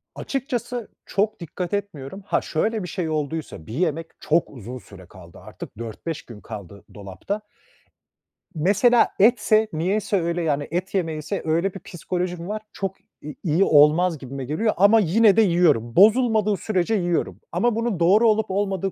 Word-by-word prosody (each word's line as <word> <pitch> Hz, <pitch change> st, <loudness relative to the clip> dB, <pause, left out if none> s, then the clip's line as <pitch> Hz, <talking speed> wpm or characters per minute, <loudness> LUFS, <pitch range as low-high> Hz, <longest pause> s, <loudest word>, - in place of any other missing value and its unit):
Açıkçası 250 Hz, -4 st, -4 dB, 0.2 s
çok 205 Hz, +2 st, -1 dB
dikkat 175 Hz, +2 st, -5 dB
etmiyorum. 195 Hz, -3 st, -5 dB
Ha, -, -, 0 dB
şöyle 215 Hz, +6 st, -1 dB
bir 180 Hz, -, -5 dB
şey 170 Hz, -1 st, -3 dB
olduysa, 155 Hz, -, -4 dB
bir 110 Hz, -, -8 dB
yemek 165 Hz, +2 st, -1 dB
çok 165 Hz, +2 st, +1 dB
uzun 125 Hz, -1 st, -9 dB
süre 100 Hz, -6 st, -14 dB
kaldı 85 Hz, -1 st, -15 dB
artık -, -, -11 dB
4-5 115 Hz, +8 st, -6 dB
gün 110 Hz, -4 st, -12 dB
kaldı 100 Hz, -3 st, -10 dB
dolapta 100 Hz, -, -6 dB, 1.1 s
mesela 210 Hz, +9 st, +4 dB
etse, 215 Hz, 0 st, +4 dB
niyeyse 195 Hz, +4 st, 0 dB
öyle, 170 Hz, +1 st, -1 dB
yani 145 Hz, -2 st, -1 dB
et 185 Hz, +4 st, -3 dB
yemeğiyse 165 Hz, 0 st, -2 dB
öyle 170 Hz, +4 st, 0 dB
bir 195 Hz, -, -8 dB
psikolojim 175 Hz, 0 st, -4 dB
var, 210 Hz, +1 st, -4 dB
çok 195 Hz, -1 st, -4 dB, 0.3 s
i 150 Hz, 0 st, -7 dB
iyi 170 Hz, +2 st, +2 dB
olmaz 155 Hz, +2 st, +4 dB
gibime 135 Hz, 0 st, -7 dB
geliyor 210 Hz, -, 0 dB
ama 205 Hz, +5 st, +6 dB
yine 210 Hz, +2 st, +4 dB
de -, -, +7 dB
yiyorum. 165 Hz, -, +2 dB
Bozulmadığı 215 Hz, -1 st, +4 dB
sürece 210 Hz, +1 st, 0 dB
yiyorum 175 Hz, -4 st, -1 dB
ama 215 Hz, +7 st, +1 dB
bunun 230 Hz, -5 st, -1 dB
doğru 205 Hz, +7 st, +5 dB
olup 215 Hz, -2 st, +1 dB
olmadığı 195 Hz, -1 st, -1 dB
180 Hz, 155 wpm, -23 LUFS, 150-210 Hz, 1.1 s, de